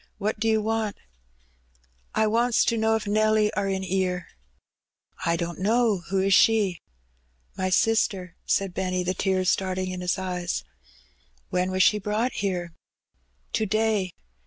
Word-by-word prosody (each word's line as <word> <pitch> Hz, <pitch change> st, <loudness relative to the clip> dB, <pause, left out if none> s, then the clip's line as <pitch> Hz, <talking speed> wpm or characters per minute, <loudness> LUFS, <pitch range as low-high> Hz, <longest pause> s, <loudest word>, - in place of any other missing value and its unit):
"What 210 Hz, +1 st, -2 dB
do 225 Hz, -, 0 dB
you 220 Hz, -1 st, +2 dB
want?'' 220 Hz, -1 st, -1 dB
'^ -, -, -33 dB, 1.2 s
I 220 Hz, -, +3 dB
wants 235 Hz, +2 st, +2 dB
to 235 Hz, -, +1 dB
know 220 Hz, 0 st, +2 dB
if 220 Hz, -, -2 dB
Nelly 215 Hz, 0 st, +2 dB
are 200 Hz, -1 st, -1 dB
in 190 Hz, 0 st, -2 dB
'ere? 185 Hz, -1 st, -1 dB, 0.5 s
" -, -, -15 dB
"I 170 Hz, -, +3 dB
don't 170 Hz, +1 st, -4 dB
know. 220 Hz, +1 st, +2 dB
Who 195 Hz, 0 st, +1 dB
is 195 Hz, +1 st, +2 dB
she?" 205 Hz, -5 st, +4 dB, 0.7 s
"My 185 Hz, 0 st, -1 dB
sister," 185 Hz, -3 st, +1 dB
said 195 Hz, -2 st, 0 dB
Benny, 185 Hz, -1 st, -1 dB
the 180 Hz, +1 st, -1 dB
tears 185 Hz, -1 st, +1 dB
starting 185 Hz, -1 st, -1 dB
in 180 Hz, 0 st, -5 dB
his 180 Hz, +2 st, 0 dB
eyes. 180 Hz, -2 st, -3 dB, 0.9 s
"When 180 Hz, +1 st, +1 dB
was 185 Hz, 0 st, +2 dB
she 210 Hz, -, +4 dB
brought 210 Hz, +5 st, -1 dB
here?" 180 Hz, -4 st, -3 dB, 0.8 s
"To 220 Hz, -, 0 dB
day. 215 Hz, -3 st, +1 dB
195 Hz, 160 wpm, -25 LUFS, 185-215 Hz, 1.2 s, she